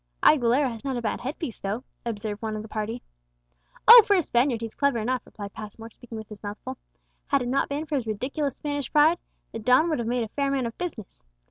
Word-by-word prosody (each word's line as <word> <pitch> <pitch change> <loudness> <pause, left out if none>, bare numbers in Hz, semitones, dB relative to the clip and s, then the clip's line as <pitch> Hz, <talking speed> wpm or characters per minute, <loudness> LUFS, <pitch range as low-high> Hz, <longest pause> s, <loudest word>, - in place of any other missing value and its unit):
'" - - -39
"Aguilera 265 -1 +5
has 225 -1 -9
not 270 -2 -2
a - - -2
bad 215 - -2
headpiece, 270 -2 -5
though," 205 +6 -3 0.2
observed 210 -2 -4
one 220 -1 -3
of 215 - -5
the - - -9
party. 220 +3 -4 0.8
"Oh, 470 +1 +13
for 405 - +3
a 360 - +3
Spaniard 240 -2 +1
he's 225 -1 -5
clever 280 -4 +1
enough," 250 +3 -1
replied 200 -1 -8
Passmore, 225 +2 -9
speaking 235 -1 -10
with 220 -1 -8
his 210 -1 -11
mouth 205 0 -5
full; 260 0 -6 0.5
"had 280 -3 +2
it - - -4
not 265 +3 +1
been 290 +2 -2
for 310 - -7
his 260 -5 -1
ridiculous 265 +7 -2
Spanish 290 -2 -4
pride, 310 +3 +5 0.3
the 225 - -5
don 255 +9 +4
would 310 - 0
have 235 - -2
made 240 0 0
a - - -4
fair 280 +4 -1
man 270 -2 0
of 230 - -5
business. 235 - -6
245 Hz, 240 wpm, -26 LUFS, 220-280 Hz, 0.8 s, Oh